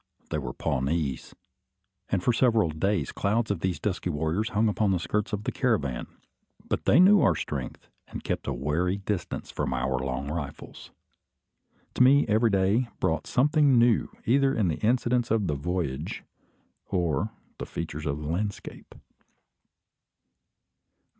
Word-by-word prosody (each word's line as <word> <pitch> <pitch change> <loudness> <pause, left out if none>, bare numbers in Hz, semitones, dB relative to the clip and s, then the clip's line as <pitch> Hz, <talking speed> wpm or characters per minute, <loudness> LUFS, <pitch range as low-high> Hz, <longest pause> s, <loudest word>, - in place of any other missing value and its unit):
They 75 - 0
were 65 -4 -5
Pawnees; 70 +1 -2 0.7
and 95 -2 0
for 120 - +3
several 115 -8 +3
days 85 -1 -1
clouds 110 +2 0
of 100 - -2
these 90 0 -1
dusky 90 -3 -2
warriors 80 +8 -1
hung 110 -2 +2
upon 105 0 +1
the 95 - +2
skirts 105 +5 -2
of 105 -1 -3
the - - -2
caravan. 85 - -1 0.6
But - - -2
they - - +5
knew 195 +2 +7
our 90 - +4
strength, 70 -4 -5 0.2
and - - -8
kept - - -3
at - - 0
a - - -1
wary 80 +9 0
distance 95 -3 -4
from 65 - -2
our 65 +1 -1
long 65 +2 -3
rifles. 75 -3 -7 1.0
To - - -1
me 140 +3 +6
every 110 +2 +3
day 100 +5 +2
brought - - 0
something 145 0 +3
new, 120 -1 +3 0.2
either 135 +3 +3
in 105 -6 +1
the 80 - -2
incidents 120 +1 +1
of 110 -2 +1
the 75 - 0
"voyage" 75 -1 -3 0.6
or 90 +2 0 0.3
the - - -5
features 75 +1 -5
of 70 0 -1
the 75 - -5
landscape. 100 +5 -4
95 Hz, 155 wpm, -27 LUFS, 75-115 Hz, 1.0 s, knew